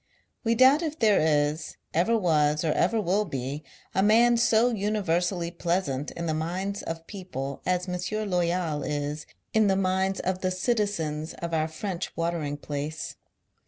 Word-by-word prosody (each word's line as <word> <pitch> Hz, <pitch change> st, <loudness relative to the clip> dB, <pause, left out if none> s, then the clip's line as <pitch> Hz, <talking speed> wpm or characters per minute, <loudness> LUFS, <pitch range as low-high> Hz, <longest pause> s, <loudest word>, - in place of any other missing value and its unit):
We 230 Hz, -1 st, +2 dB
doubt 265 Hz, +6 st, +6 dB
if 315 Hz, -2 st, -3 dB
there 215 Hz, -6 st, +4 dB
is, 150 Hz, 0 st, +1 dB, 0.2 s
ever 200 Hz, +8 st, +3 dB
was?, 150 Hz, -5 st, +2 dB
or 155 Hz, -, +2 dB
ever 220 Hz, +8 st, +2 dB
will 200 Hz, +1 st, +1 dB
be, 140 Hz, -3 st, -4 dB, 0.3 s
a 190 Hz, -, +2 dB
man 230 Hz, +4 st, +5 dB
so 235 Hz, +1 st, +3 dB
uuiversally 180 Hz, -4 st, 0 dB
pleasant 170 Hz, -6 st, -1 dB
in 170 Hz, -, -5 dB
the 160 Hz, -, 0 dB
minds 185 Hz, +6 st, -2 dB
of 165 Hz, 0 st, -6 dB
people 140 Hz, -9 st, -6 dB
as 180 Hz, 0 st, +1 dB
M. 185 Hz, +4 st, -2 dB
Loyal 175 Hz, -4 st, 0 dB
is 145 Hz, +1 st, -3 dB, 0.3 s
in 220 Hz, -1 st, +4 dB
the 195 Hz, -, +3 dB
minds 190 Hz, 0 st, +1 dB
of 185 Hz, 0 st, -2 dB
the 185 Hz, -, +1 dB
citizens 185 Hz, -7 st, -1 dB
of 170 Hz, -1 st, -5 dB
our 155 Hz, -1 st, +1 dB
French 180 Hz, +2 st, -5 dB
watering 165 Hz, -4 st, -1 dB
place. 145 Hz, +1 st, -5 dB
175 Hz, 160 wpm, -27 LUFS, 155-205 Hz, 0.3 s, doubt